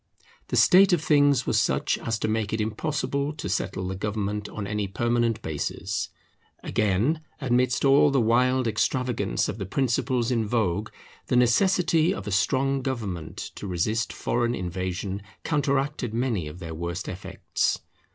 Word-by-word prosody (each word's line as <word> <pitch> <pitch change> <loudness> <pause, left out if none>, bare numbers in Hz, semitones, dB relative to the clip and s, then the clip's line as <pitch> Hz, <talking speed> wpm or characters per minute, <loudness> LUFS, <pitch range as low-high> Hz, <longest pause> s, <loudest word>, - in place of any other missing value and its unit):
The - - -2
state 190 +1 +6
of 165 -3 +2
things 145 -4 +4
was - - +2
such - - +1
as 115 -1 -2
to 110 - -2
make 110 -1 -1
it 110 - 0
impossible 140 +6 -1
to 150 - -6
settle 95 0 -2
the 95 - -3
government 105 +1 -3
on 105 - -5
any 105 0 -2
permanent 120 +3 0
basis. 80 -2 -3 0.5
Again, 110 - +1 0.2
amidst 125 -1 +1
all 140 +2 +6
the 135 -1 +2
wild 125 +3 +3
extravagance 120 - 0
of 110 - -5
the 95 - -3
principles 125 +1 0
in 115 -3 +1
vogue, 105 -2 0 0.4
the - - +1
necessity 165 - +3
of 100 - -7
a 105 - -4
strong 135 +7 +1
government 105 - -4 0.2
to 105 - -7
resist 105 +6 0
foreign 120 0 -1
invasion 95 +2 -3 0.2
counteracted 140 -5 0
many 115 -9 0
of 75 +3 -8
their 85 -3 -7
worst 85 +3 -4
effects. 95 +1 -2
115 Hz, 150 wpm, -26 LUFS, 100-135 Hz, 0.5 s, state